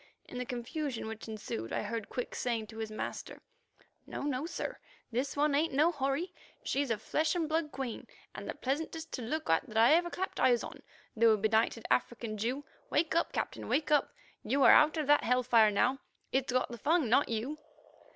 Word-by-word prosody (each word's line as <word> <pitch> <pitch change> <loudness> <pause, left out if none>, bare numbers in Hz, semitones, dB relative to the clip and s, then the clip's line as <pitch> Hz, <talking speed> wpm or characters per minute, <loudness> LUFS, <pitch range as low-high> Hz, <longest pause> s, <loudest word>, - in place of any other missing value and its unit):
In 250 - -7
the 250 - -3
confusion 250 +1 -4
which 220 0 -7
ensued, 200 - -5
I - - -1
heard 230 -3 -4
Quick 250 - -4
saying 235 -3 -1
to 220 +1 -11
his 220 -1 -3
master: 215 - -6 0.7
"No, - - -5
no, 285 +1 -1
sir; - - -5 0.3
this 255 +5 -2
one 295 0 +3
ain't 295 0 +1
no 310 +5 +4
houri. 285 +4 -2 0.3
She's 280 -1 0
a 225 - +1
flesh 310 - 0
and 335 -3 0
blood 315 -1 -1
queen, 260 -4 -5 0.3
and - - -7
the - - -3
pleasantest 320 +4 -3
to - - -4
look 305 +7 -3
at 190 +7 +1
I 230 +6 +7
ever 345 +1 +3
clapped 375 +2 -4
eyes 240 -2 +4
on, - - -9 0.3
though 225 0 +5
a - - +2
benighted 220 +2 +1
African 235 -3 0
Jew. 255 +7 -2 0.2
Wake 315 +1 +1
up, 335 - +1
Captain, - - -3
wake 300 0 +1
up; 295 - +3 0.3
you 275 +1 +1
are - - +9
out 305 +2 +5
of 310 - 0
that 295 +1 +4
hell 250 +1 +2
fire 225 -3 +5
now. 250 +6 +1 0.3
It's 265 0 0
got 255 -1 0
the 235 - -7
Fung, 315 +2 +2
not 255 +6 +3
you." 240 +7 -3
260 Hz, 200 wpm, -32 LUFS, 230-300 Hz, 0.7 s, are